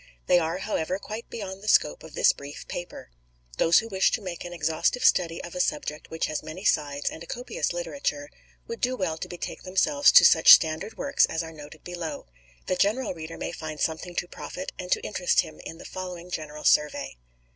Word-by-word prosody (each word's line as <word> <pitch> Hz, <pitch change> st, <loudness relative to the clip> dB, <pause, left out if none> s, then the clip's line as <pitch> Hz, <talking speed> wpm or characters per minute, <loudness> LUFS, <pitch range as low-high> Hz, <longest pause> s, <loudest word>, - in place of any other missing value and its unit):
They 175 Hz, -, +5 dB
are, 165 Hz, +1 st, -1 dB
however, 185 Hz, -3 st, -2 dB
quite 215 Hz, +3 st, -8 dB
beyond 195 Hz, -3 st, -6 dB
the 210 Hz, -, -10 dB
scope 75 Hz, -, +3 dB
of -, -, -12 dB
this -, -, +5 dB
brief 140 Hz, +1 st, -10 dB
paper. 175 Hz, -, -7 dB, 0.5 s
Those 165 Hz, +1 st, +5 dB
who 225 Hz, -, +2 dB
wish 195 Hz, -3 st, +2 dB
to -, -, 0 dB
make 180 Hz, -3 st, -6 dB
an 175 Hz, -, -7 dB
exhaustive 160 Hz, +8 st, 0 dB
study 165 Hz, -2 st, +3 dB
of 170 Hz, -, -8 dB
a 180 Hz, -, -5 dB
subject 150 Hz, -3 st, -2 dB
which 160 Hz, -, -2 dB
has 155 Hz, -, -3 dB
many 160 Hz, +6 st, -8 dB
sides 145 Hz, -1 st, +1 dB
and 160 Hz, -, -9 dB
a 170 Hz, -, -9 dB
copious 250 Hz, -, -3 dB
literature, 280 Hz, -, -3 dB, 0.3 s
would 230 Hz, -, -7 dB
do 255 Hz, +1 st, +1 dB
well 170 Hz, -7 st, -2 dB
to -, -, -5 dB
betake 175 Hz, -, -6 dB
themselves 285 Hz, +11 st, +3 dB
to -, -, +9 dB
such -, -, +8 dB
standard 160 Hz, +6 st, +3 dB
works 280 Hz, 0 st, +3 dB
as 160 Hz, +1 st, -2 dB
are 165 Hz, 0 st, -8 dB
noted 150 Hz, 0 st, -12 dB
below. 170 Hz, -4 st, -6 dB, 0.4 s
The 185 Hz, -, -1 dB
general 215 Hz, +5 st, +1 dB
reader 165 Hz, -1 st, -8 dB
may -, -, -4 dB
find 155 Hz, -2 st, -7 dB
something 170 Hz, +2 st, -2 dB
to 175 Hz, -, -1 dB
profit -, -, -7 dB
and -, -, -6 dB
to 460 Hz, -2 st, +2 dB
interest -, -, +2 dB
him -, -, -11 dB
in 165 Hz, -, -8 dB
the -, -, -12 dB
following 180 Hz, -1 st, -7 dB
general 150 Hz, -2 st, -5 dB
survey. 150 Hz, -, +2 dB
175 Hz, 210 wpm, -26 LUFS, 155-200 Hz, 0.5 s, to